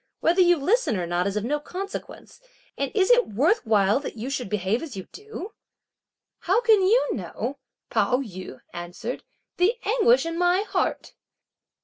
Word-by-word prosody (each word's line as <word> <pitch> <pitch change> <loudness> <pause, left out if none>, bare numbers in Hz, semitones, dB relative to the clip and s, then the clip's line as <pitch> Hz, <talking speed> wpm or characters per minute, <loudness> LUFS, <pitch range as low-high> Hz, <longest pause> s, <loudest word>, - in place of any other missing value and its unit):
Whether 350 +3 +3
you 350 -1 +5
listen 370 - +1
or 180 - -2
not 175 +2 0
is 200 +1 -2
of 210 - -1
no 295 +6 0
consequence; 390 +8 -8 0.3
and 275 -1 -2
is 390 +1 +3
it 485 0 +5
worth 305 - +2
while 210 +1 +3
that 280 - -7
you 245 +5 -4
should 250 -6 -3
behave 210 +3 0
as 290 -11 -7
you 190 - -5
do?" 425 -1 -8 0.9
"How 380 +6 +2
can 445 -4 +4
you 440 +7 +3
know," - - -5 0.3
Pao 250 - +2
yü 185 - -7
answered, 175 +8 -6 0.3
"the 395 +7 +3
anguish 470 -1 +4
in 330 +1 -3
my 355 +2 +3
heart!" 425 - -2
320 Hz, 165 wpm, -25 LUFS, -, 0.9 s, you